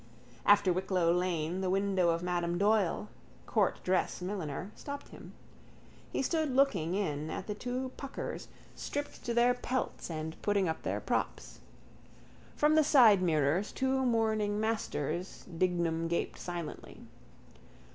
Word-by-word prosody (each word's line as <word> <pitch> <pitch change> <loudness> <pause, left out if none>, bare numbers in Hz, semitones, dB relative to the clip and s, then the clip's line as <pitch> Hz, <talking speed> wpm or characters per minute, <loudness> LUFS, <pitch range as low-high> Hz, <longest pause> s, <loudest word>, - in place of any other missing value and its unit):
After 200 -3 +6
Wicklow 180 -2 +1
lane 180 0 -1
the 185 - 0
window 190 -2 +2
of 170 +1 0
Madame 175 -1 -1
Doyle, 205 0 +2 0.4
courtdress 185 0 +1
milliner, 180 -1 -4
stopped 285 0 -7
him. - - -11 0.8
He - - -1
stood 315 +1 0
looking 190 - +2
in 155 -6 -2
at 185 - -4
the 210 - -3
two 250 +4 -4
puckers 275 -1 -5 0.3
stripped 290 0 -5
to 235 - -1
their 240 +1 +5
pelts 250 -4 -3
and 160 -1 -5
putting 200 -3 +2
up 160 - -2
their - - -2
props. - - -2 1.0
From 300 +1 +3
the 310 0 +5
sidemirrors 185 - +4
two 265 0 0
mourning 220 -4 +1
Masters 185 -6 -2
Dignam 170 -2 0
gaped 170 0 -2
silently. 175 -3 -6
190 Hz, 125 wpm, -31 LUFS, 170-230 Hz, 1.0 s, After